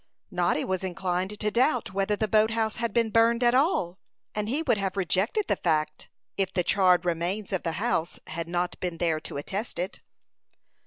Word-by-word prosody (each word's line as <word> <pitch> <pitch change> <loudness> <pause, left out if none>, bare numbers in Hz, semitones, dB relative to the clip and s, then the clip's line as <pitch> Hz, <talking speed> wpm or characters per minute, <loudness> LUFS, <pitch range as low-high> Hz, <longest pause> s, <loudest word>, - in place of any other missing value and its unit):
Noddy 175 -4 +1
was 185 0 -2
inclined 185 +2 -2
to 210 -1 0
doubt 245 -3 +1
whether 195 +2 +1
the 215 +1 -1
boat 215 +1 +4
house 225 -1 -1
had 230 -1 -1
been 230 0 +1
burned 230 +2 +4
at 240 0 +5
all; 250 - +1 0.3
and 210 0 -2
he 290 +6 0
would 245 -9 +2
have 195 0 -2
rejected 195 - +1
the - - +2
fact, 155 -2 -1 0.3
if 190 -1 0
the 180 - 0
charred 185 -1 +3
remains 180 +5 -1
of 190 - 0
the 165 - -2
house 170 -4 -1
had 165 +1 -5
not 175 +1 -2
been 175 -2 -3
there 165 -2 +1
to 150 - -8
attest 195 +10 -4
it. 180 +3 -4
190 Hz, 195 wpm, -27 LUFS, 175-220 Hz, 0.3 s, at